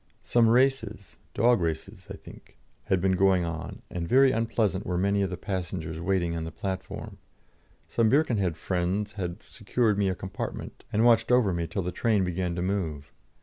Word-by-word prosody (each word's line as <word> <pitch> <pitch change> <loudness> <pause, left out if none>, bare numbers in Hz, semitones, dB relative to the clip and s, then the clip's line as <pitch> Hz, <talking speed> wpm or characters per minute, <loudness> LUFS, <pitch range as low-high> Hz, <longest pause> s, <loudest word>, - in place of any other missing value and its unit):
Some 115 -2 +3
races 115 -5 +1 0.2
dog 120 -1 +4
races 80 -2 -4
I - - -6
think, - - -15 0.3
had 95 -2 +1
been 95 +1 +2
going 95 -1 +3
on, 80 -1 -6
and 85 -1 -3
very 135 +4 +5
unpleasant 110 -5 0
were 90 -3 -2
many 100 +2 +1
of 95 - 0
the 90 - -5
passengers 90 -4 -4
waiting 85 -1 0
on 80 - -3
the 80 - -5
platform. 95 +2 -6 0.7
Some 115 -2 +2
Birkenhead 110 - +2
friends 95 +4 -1
had 90 -1 -5
secured 105 0 0
me 100 -1 +2
a 95 - -1
compartment, 95 0 -6
and 110 +2 +2
watched 115 0 +4
over 120 -7 +4
me 85 -1 -2
till 90 +4 -3
the 90 - -3
train 105 +1 +1
began 90 -1 -2
to 90 - -2
move. 80 -7 -3
95 Hz, 180 wpm, -27 LUFS, 90-110 Hz, 0.7 s, very